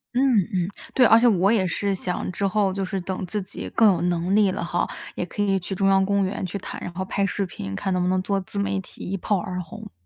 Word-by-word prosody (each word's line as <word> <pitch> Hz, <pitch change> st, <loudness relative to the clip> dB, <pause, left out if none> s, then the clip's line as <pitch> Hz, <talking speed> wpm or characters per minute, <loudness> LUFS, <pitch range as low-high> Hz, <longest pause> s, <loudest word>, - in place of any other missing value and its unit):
嗯， -, -, +3 dB, 0.3 s
嗯， 180 Hz, -1 st, +1 dB, 0.3 s
对。 255 Hz, -, +5 dB
而 225 Hz, -, +7 dB
且 235 Hz, -, +3 dB
我 195 Hz, -4 st, +4 dB
也 200 Hz, -5 st, +3 dB
是 195 Hz, +2 st, -1 dB
想 180 Hz, 0 st, -3 dB
之 200 Hz, -, -1 dB
后 195 Hz, -1 st, +1 dB
就 195 Hz, 0 st, -2 dB
是 190 Hz, +1 st, -2 dB
等 185 Hz, +1 st, -4 dB
自 205 Hz, +3 st, -2 dB
己 190 Hz, -, -7 dB
更 225 Hz, -, +5 dB
有 -, -, -2 dB
能 175 Hz, +2 st, +1 dB
力 205 Hz, -3 st, +4 dB
了 -, -, -4 dB
哈， 175 Hz, +1 st, 0 dB, 0.3 s
也 -, -, -2 dB
可 205 Hz, +4 st, -5 dB
以 195 Hz, -1 st, +2 dB
去 190 Hz, +2 st, -4 dB
中 195 Hz, +1 st, +1 dB
央 195 Hz, 0 st, +4 dB
公 200 Hz, 0 st, +2 dB
园 190 Hz, 0 st, -3 dB
去 185 Hz, +3 st, -4 dB
弹， -, -, -7 dB
然 180 Hz, -, -6 dB
后 190 Hz, +1 st, -3 dB
拍 200 Hz, +1 st, 0 dB
视 200 Hz, +1 st, -1 dB
频， 95 Hz, -, -7 dB
看 190 Hz, -, -1 dB
能 180 Hz, -, +1 dB
不 180 Hz, -, +1 dB
能 185 Hz, 0 st, +2 dB
做 200 Hz, +1 st, 0 dB
自 200 Hz, +2 st, -5 dB
媒 195 Hz, -1 st, 0 dB
体 -, -, -12 dB
一 195 Hz, -, -1 dB
炮 205 Hz, +2 st, 0 dB
而 185 Hz, -2 st, -4 dB
红。 160 Hz, -, -10 dB
190 Hz, 290 characters per minute, -24 LUFS, 180-200 Hz, 0.3 s, 而